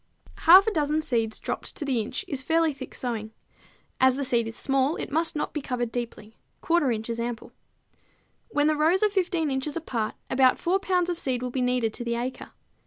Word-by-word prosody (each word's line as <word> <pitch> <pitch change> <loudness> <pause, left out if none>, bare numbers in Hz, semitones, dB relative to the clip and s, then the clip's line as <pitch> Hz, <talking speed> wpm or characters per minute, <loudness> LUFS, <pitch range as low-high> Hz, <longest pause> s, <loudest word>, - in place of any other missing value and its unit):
Half 375 +3 +10
a 445 - +1
dozen 310 -2 0
seeds 225 -5 -1
dropped - - -5
to 300 - -4
the 260 -4 0
inch 220 - -5
is 270 -2 -1
fairly 325 +1 +2
thick 265 -1 -9
sowing. 220 -3 -4 0.7
As 260 -1 +5
the 280 0 -2
seed 235 -3 +1
is 225 - -6
small, 270 +3 +1
it - - -5
must 325 +2 0
not 295 - -2
be 300 - -3
covered 245 -3 -3
deeply; 230 -2 -6 0.3
1/4 330 -6 +2
inch 220 0 -6
is 230 0 -3
ample. 235 -1 -4 1.0
When 290 -9 +1
the 310 0 +3
rows 325 +6 +3
are 420 - +3
15 350 -6 0
inches 270 +4 -2
apart 235 -9 -3
about 260 -1 +4
4 370 +3 +1
pounds 360 -2 +1
of 345 - -4
seed 255 -5 -1
will 250 - -3
be 260 - -2
needed 250 -3 +1
to 240 - -5
the 235 0 -1
acre. 245 +2 -4
265 Hz, 210 wpm, -26 LUFS, 240-320 Hz, 1.0 s, Half